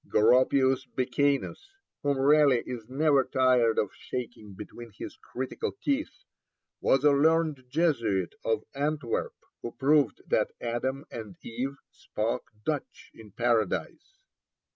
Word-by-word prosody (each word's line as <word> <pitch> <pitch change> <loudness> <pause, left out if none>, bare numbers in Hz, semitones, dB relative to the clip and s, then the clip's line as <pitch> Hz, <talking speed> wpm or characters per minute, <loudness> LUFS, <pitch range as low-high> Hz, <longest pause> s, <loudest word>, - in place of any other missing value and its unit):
Goropius 130 +3 +3
Becanus, 140 - 0 0.4
whom 140 -1 +1
Raleigh 140 -2 +4
is 120 -3 -7
never 140 0 +3
tired 125 -4 +3
of 105 - 0
shaking 120 -5 -7
between 115 +4 -9
his - - -7
critical 130 - -5
teeth, 285 +2 -2 0.6
was 135 +1 +3
a 150 - +6
learned 155 -1 +2
Jesuit 115 - +1
of 110 -1 0
Antwerp, 145 -3 -2 0.3
who 120 - -6
proved 140 -2 +2
that - - +1
Adam 130 +4 -2
and 110 -5 -7
Eve 130 +4 -4 0.2
spoke 110 +2 -3 0.2
Dutch 150 -3 -4
in 110 -1 -14
Paradise. 115 - -1
130 Hz, 120 wpm, -28 LUFS, 115-145 Hz, 0.6 s, a